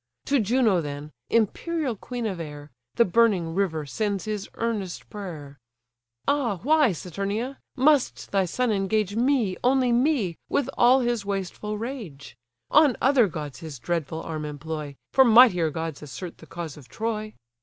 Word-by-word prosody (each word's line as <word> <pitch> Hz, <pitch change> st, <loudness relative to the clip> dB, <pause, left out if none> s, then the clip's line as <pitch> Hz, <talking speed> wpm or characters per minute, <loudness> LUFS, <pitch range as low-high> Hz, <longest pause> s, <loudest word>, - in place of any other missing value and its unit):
To 280 Hz, -1 st, +2 dB
Juno 220 Hz, -4 st, +3 dB
then, 145 Hz, 0 st, -6 dB, 0.2 s
imperial 260 Hz, -, 0 dB
queen 240 Hz, +3 st, -5 dB
of 190 Hz, -5 st, -3 dB
air, 150 Hz, -2 st, -8 dB, 0.2 s
The 235 Hz, -, +5 dB
burning 190 Hz, -5 st, +2 dB
river 165 Hz, -5 st, 0 dB
sends 200 Hz, +6 st, -2 dB
his 210 Hz, -2 st, -4 dB
earnest 215 Hz, -6 st, -3 dB
prayer: 155 Hz, -9 st, -8 dB, 0.7 s
"Ah 255 Hz, -9 st, +1 dB
why, 300 Hz, -3 st, +4 dB
Saturnia; 200 Hz, -, -4 dB, 0.2 s
must 280 Hz, 0 st, +2 dB
thy 195 Hz, -2 st, +2 dB
son 245 Hz, +7 st, 0 dB
engage 205 Hz, 0 st, 0 dB
Me, 240 Hz, -5 st, +2 dB
only 255 Hz, -1 st, +3 dB
me, 235 Hz, -, +1 dB
with 275 Hz, -2 st, 0 dB
all 250 Hz, +2 st, +5 dB
his 240 Hz, -3 st, 0 dB
wasteful 200 Hz, +1 st, -3 dB
rage? 210 Hz, -, -7 dB, 0.4 s
On 295 Hz, -4 st, +5 dB
other 260 Hz, -4 st, +4 dB
gods 150 Hz, -6 st, -6 dB
his 155 Hz, -4 st, -8 dB
dreadful 165 Hz, +2 st, -3 dB
arm 155 Hz, -2 st, -4 dB
employ, 150 Hz, -1 st, -5 dB, 0.2 s
For 265 Hz, -, +7 dB
mightier 225 Hz, -9 st, +6 dB
gods 160 Hz, 0 st, -5 dB
assert 150 Hz, +5 st, -8 dB
the -, -, -14 dB
cause 165 Hz, -4 st, -6 dB
of 140 Hz, -4 st, -14 dB
Troy. 215 Hz, -1 st, -3 dB
205 Hz, 150 wpm, -25 LUFS, 165-240 Hz, 0.7 s, For